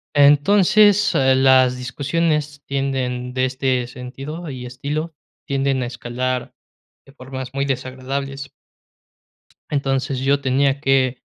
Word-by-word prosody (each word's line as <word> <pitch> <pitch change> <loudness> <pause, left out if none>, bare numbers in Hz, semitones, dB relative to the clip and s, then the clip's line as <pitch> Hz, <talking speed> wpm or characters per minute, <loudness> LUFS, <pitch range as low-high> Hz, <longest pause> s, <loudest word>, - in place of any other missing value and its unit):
Entonces, 195 +8 +5
ah, 130 -1 +3
las 130 -1 +4
discusiones 145 +3 -2
tienden 130 -2 -2
de 130 - +2
este 130 -1 0
sentido 135 +7 -8
y 125 -2 -7
estilo, 145 +6 -4 0.3
tienden 135 -1 0
a - - -2
escalar 125 +1 -4 0.5
de 135 - -18
formas 130 -1 -8
muy 140 0 -1
desagradables. 135 +1 -4 1.2
Entonces, 135 -2 -1
yo 140 +1 +2
tenía 135 +1 +1
que, 130 -2 +1
135 Hz, 110 wpm, -20 LUFS, 130-140 Hz, 1.2 s, Entonces